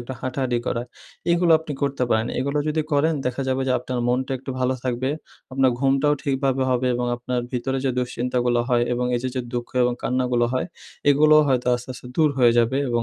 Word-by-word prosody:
একটু 120 +2 -7
হাঁটাহাঁটি 130 -2 -1
করা 120 0 -1 0.5
এগুলো 170 -1 +3
আপনি 160 -2 -7
করতে 140 -2 -1
পারেন। 110 +1 +2
এগুলা 140 +3 -1
যদি 155 +1 0
করেন 155 +3 +3
দেখা 125 +2 -2
যাবে 130 0 0
যে 130 - +3
আপনার 125 0 -4
মনটা 130 +2 0
একটু 135 +2 -7
ভালো 130 +1 +1
থাকবে, 130 +2 -1 0.4
আপনার 130 -1 +3
ঘুমটাও 135 +2 +2
ঠিকভাবে 135 -2 0
হবে 125 0 +1
এবং 125 0 -1
আপনার 125 +1 -2
ভিতরে 130 +2 -1
যে 135 - +2
দুশ্চিন্তাগুলো 125 0 0
হয় 120 -2 +3
এবং 125 0 -1
এই 120 - -3
যে, 130 - -1
যে 130 - -1
দুঃখ 120 -1 -3
এবং 125 - +2
কান্নাগুলো 125 -1 +1
হয় 130 - -1 0.4
এগুলো 155 +2 +5
হয়তো 125 -2 +1
আস্তে, 120 +1 -6
আস্তে 125 - -11
দূর 155 -2 +4
হয়ে 120 -2 +5
যাবে 120 +3 +2
এবং 120 -1 0
130 Hz, 205 wpm, -23 LUFS, 125-135 Hz, 0.5 s, এগুলো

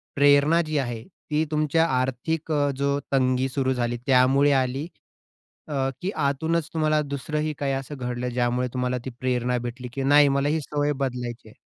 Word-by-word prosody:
प्रेरणा 145 +3 +5
जी 155 -2 -2
आहे 120 -4 -2 0.3
ती 150 +1 +2
तुमच्या 155 +2 +2
आर्थिक 145 +6 -2
अ, 145 -1 +2
जो 140 0 0
तंगी 130 -1 +2
सुरू 130 0 0
झाली 120 -1 -1
त्यामुळे 135 +2 +4
आली 135 +3 0 0.8
अ, - - -6 0.3
की 190 - -1 0.2
आतूनच 160 +3 0
तुम्हाला 155 -1 +2
दुसरंही 150 +2 -3
काही 140 -1 -1
असं 135 +2 -4
घडलं 125 0 -3
ज्यामुळे 125 +1 0
तुम्हाला 125 0 -1
ती 130 - -4
प्रेरणा 125 -1 0
भेटली 120 +1 -6
की 135 - -3
नाही, 145 +1 +6
मला 140 +1 +1
ही 155 +1 +1
सवय 145 0 -1
बदलायची 125 -4 -4
आहे? - - -17
135 Hz, 170 wpm, -25 LUFS, 125-150 Hz, 0.8 s, नाही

